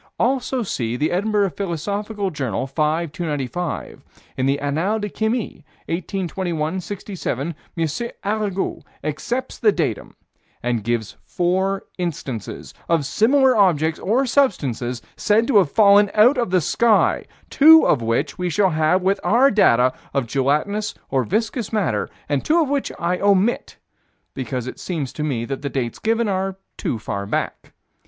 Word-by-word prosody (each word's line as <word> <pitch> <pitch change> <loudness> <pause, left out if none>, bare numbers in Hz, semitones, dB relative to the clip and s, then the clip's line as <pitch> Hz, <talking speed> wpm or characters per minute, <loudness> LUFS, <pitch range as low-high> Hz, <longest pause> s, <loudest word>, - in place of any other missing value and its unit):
Also 255 0 0
see 120 - -2
the 150 +4 0
Edinburgh 200 +1 +1
Philosophical 200 +3 -3
Journal, 130 - -2
5 155 +3 -1
295. 160 -1 -4 0.3
In 130 0 0
the 140 +1 +2
Annales 165 +10 -1
de 210 - -3
Chimie, 220 -5 -2 0.2
1821 175 -2 -2
67, 175 - -4 0.2
M. 165 -1 +1 0.4
Arago 205 -2 -1 0.2
accepts 235 - -3
the 425 - +4
datum, - - -3 0.5
and 120 -3 -1
gives 115 -1 -2
four 190 +2 0
instances 135 - -5 0.2
of 165 -4 +2
similar 255 - +3
objects 165 -6 +2
or 240 +8 +1
substances 135 - 0
said 220 +2 +2
to 240 -3 +3
have 180 -7 +2
fallen 205 -1 +6
from 240 +1 +4
the 185 0 +3
sky, 225 +8 +2 0.3
two 320 +3 +8
of 125 - +3
which 115 +9 -1
we 180 0 -1
shall 190 +2 +2
have 160 +4 +2
with 195 +1 +2
our 255 +6 +4
data 125 - +4 0.2
of 135 -3 +1
gelatinous, 145 - 0 0.2
or 130 -1 +2
viscous 220 - -2
matter, 180 - 0 0.2
and 145 -2 0
two 330 +3 +3
of 315 - +2
which 280 -1 -1
I 175 +1 -1
omit, 200 +3 +1 0.6
because 130 -2 -4
it 130 - -7
seems 155 -8 -4
to 150 - -4
me 125 -6 -1
that 135 +2 -5
the 140 - -3
dates 125 -4 -3
given 225 +1 +1
are 190 -1 -1 0.2
too 120 - -2
far 100 -2 -4
back. - - -3
180 Hz, 145 wpm, -21 LUFS, 140-210 Hz, 0.6 s, two